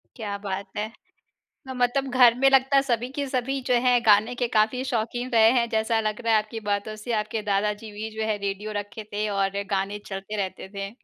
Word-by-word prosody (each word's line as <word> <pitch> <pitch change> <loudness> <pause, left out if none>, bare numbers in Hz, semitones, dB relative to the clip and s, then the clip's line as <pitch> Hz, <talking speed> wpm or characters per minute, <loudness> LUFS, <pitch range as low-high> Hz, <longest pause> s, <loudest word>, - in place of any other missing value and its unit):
क्या 205 -4 -4
बात 195 0 -4
है। 215 +1 -2 0.8
मतलब 260 +1 0
घर 245 -2 +6
में 270 - +6
लगता 270 +1 +4
है 275 - +7
सभी 245 -2 -1
के 280 +1 -3
सभी 265 +1 -1
जो 250 - +4
है, 250 -1 +5
गाने 215 +3 +4
के 245 0 0
काफ़ी 220 +3 +1
शौकीन 240 0 -2
रहे 225 -1 +6
हैं, 240 -2 +2
जैसा 220 0 +1
लग 215 +1 -2
रहा 230 - +3
है 220 - +6
आपकी 225 +1 -7
बातों 205 +1 -1
से, 215 +3 -6
आपके 215 0 -1
दादाजी 210 +2 -1
भी 215 +2 -5
जो 220 - -2
है 215 -1 0
रेडियो 200 +1 -4
रखे 205 +2 -8
थे 210 +1 -1
और 200 0 0
गाने 195 +2 -1
चलते 195 +2 -6
रहते 190 -1 -4
थे। 195 0 -4
220 Hz, 210 wpm, -25 LUFS, 205-245 Hz, 0.8 s, है